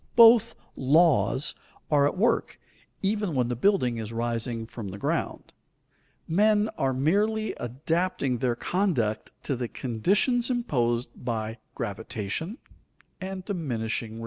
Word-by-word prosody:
Both 230 -1 +7 0.2
"laws" 145 0 +3 0.4
are 145 -1 +5
at 145 - -3
work, 225 +6 +1 0.4
even 205 -4 0
when 125 -2 +1
the 120 - -1
building 125 - +2
is 110 0 -5
rising 115 0 -2
from 110 -2 -7
the 95 +1 -6
ground. - - -2 0.7
Men 210 +4 +3
are 135 -1 +1
merely 205 +11 +1
adapting 140 +1 -1
their 120 -1 +1
conduct 135 - 0
to 140 - -1
the 120 -1 -3
conditions 205 - +1
imposed 125 - 0
by 110 -2 -3 0.2
gravitation 110 - -4 0.6
and 190 0 -5
diminishing 115 - -2
returns. 115 - -8
135 Hz, 120 wpm, -27 LUFS, 115-195 Hz, 0.7 s, Both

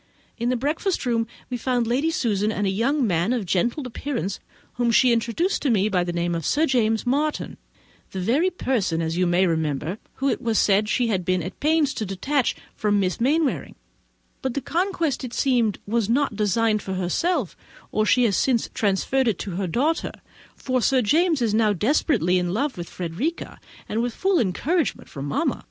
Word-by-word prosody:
In 235 +1 0
the 255 - +1
breakfast 300 +7 -1
room 230 -2 +1 0.2
we 250 - -1
found 245 0 0
Lady 260 +7 +1
Susan, 215 -8 0
and 205 -1 -1
a 190 - +1
young 255 +7 +1
man 180 +3 +1
of 235 -5 -2
gentlemanlike 235 - -1
appearance, 240 -9 -3 0.4
whom 240 -1 +1
she 245 +2 +5
introduced 235 - 0 0.3
by 180 -2 +2
the 175 - -3
name 175 0 -1
of 165 -1 -3
Sir 310 - +2
James 225 -5 +1
Martin—the 280 -7 -4
very 260 - +2
person, 235 - -1
as 165 0 -1
you 180 0 +2
may 175 +2 +3
remember, 160 +2 -1 0.2
whom 270 0 0
it - - -3
was 225 -2 0
said 210 +1 +3
she 245 0 +1
had 190 -4 0
been 185 0 0
at 185 +3 -7
pains 300 -1 +2
to - - -3
detach 235 +8 0 0.2
from 205 -1 +1
Miss 185 +2 -1
Mainwaring; 290 +3 +1 0.7
but 260 -2 -3
the - - +1
conquest, 335 -1 -1
it 245 -2 -6
seems, 240 -6 +2
was 225 0 0
not 260 -1 +1
designed 215 +1 +1
for 190 - -4
herself, 210 - -1 0.4
or 215 - +1
she 250 +4 +3
has 210 -5 +2
since 240 +1 +1
transferred 225 +6 +1
it 215 -6 +1
to 200 - -5
her 185 +2 -2
daughter; 285 - 0 0.4
for 255 -1 -1
Sir 255 +1 +3
James 315 - +2
is 220 -3 +1
now 215 -1 +3
desperately 200 - +2
in 180 +1 -2
love 275 +4 -1
with 175 -1 -7
Frederica, 185 - -4 0.3
and 220 - -1
with 240 -1 -2
full 380 -1 +2
encouragement 290 - -1
from 140 -2 -6
mamma. 295 - -1
230 Hz, 185 wpm, -23 LUFS, 190-275 Hz, 0.7 s, she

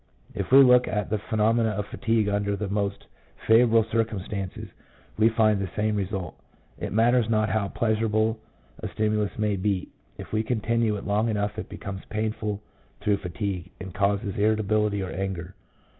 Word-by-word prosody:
If - - -4
we 135 +1 +9
look 125 -1 +6
at 105 -1 -2
the 110 - +1
phenomena 110 +2 +1
of 105 - -2
fatigue 115 -1 0
under 100 0 0
the 105 0 -3
most 100 0 -2 0.4
favourable 115 0 +5
circumstances, 105 -4 -2 0.5
we 110 +1 +4
find 110 -2 +3
the 95 - -3
same 105 0 0
result. 95 -2 -3 0.4
It - - -4
matters 115 +2 +3
not 110 -1 +2
how 110 -2 0
pleasurable 110 +1 0 0.4
a - - -4
stimulus 105 -1 -1
may 105 -2 0
be, 95 -1 -1 0.3
if - - -9
we 110 - +2
continue 115 -1 0
it - - -8
long 105 +3 +1
enough 105 0 -1
it - - -7
becomes 95 -1 -7
painful 105 -1 -3 0.4
through 105 -1 +2
fatigue, 95 -1 -4
and 95 -1 -7
causes 100 +1 0
irritability 105 -1 +1
or 95 - -5
anger. 95 0 -4
105 Hz, 160 wpm, -26 LUFS, 100-110 Hz, 0.5 s, we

